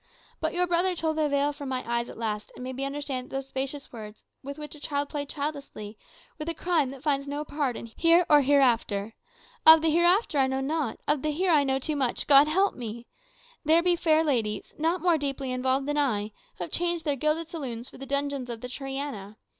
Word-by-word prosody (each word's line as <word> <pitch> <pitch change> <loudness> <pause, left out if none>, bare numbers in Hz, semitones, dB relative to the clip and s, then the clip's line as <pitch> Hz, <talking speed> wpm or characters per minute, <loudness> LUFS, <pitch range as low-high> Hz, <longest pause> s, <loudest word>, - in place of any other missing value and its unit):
But 315 +1 -2
your 360 0 +2
brother 355 +1 +1
tore 320 -1 0
the 310 -1 0
veil 285 +1 +1
from 285 -2 -7
my 255 -1 -3
eyes 235 0 -1
at - - -10
last, 215 -2 -3
and - - -8
made 260 0 -5
me 270 +1 -2
understand 275 -2 -4
that - - -7
those 270 0 -3
specious 270 +1 -5
words, 215 -2 -10 0.2
with 280 +2 -7
which 300 -1 -8
a 300 - -12
child 285 -1 -2
played 285 -2 -4
childishly, 280 -8 -5 0.4
were 305 - -4
the 330 0 -3
crime 320 -5 +1
that 270 0 -10
finds 280 -2 0
no 290 +1 -3
pardon 285 -6 -2
here 335 +1 +5
or 295 -1 +6
hereafter. 240 -7 +2 0.5
Of 320 0 +9
the 320 - +3
hereafter 345 0 +3
I 265 - +4
know 265 0 -1
not; 285 -2 -2
of 295 -2 +2
the 305 - -1
here 350 +5 +1
I 300 -3 +5
know 265 -1 +1
too 300 +3 -2
much, 260 -4 0
God 285 0 +7
help 380 +6 +2
me! 235 -1 -7 0.6
There 325 +2 +4
be 355 -1 +3
fair 320 -2 +3
ladies, 225 -9 -1
not 330 +3 +1
more 345 -3 +3
deeply 275 -2 -3
involved 260 +2 0
than 295 0 0
I, 215 -7 0 0.3
who - - -4
have 170 - -7
changed 345 -1 -1
their 290 -2 +1
gilded 305 +4 0
saloons 255 -8 -5
for - - -13
the 270 - -8
dungeons 280 -2 -2
of 230 -2 -6
the 250 - -6
Triana. 270 -6 -5
285 Hz, 225 wpm, -27 LUFS, 255-310 Hz, 0.6 s, Of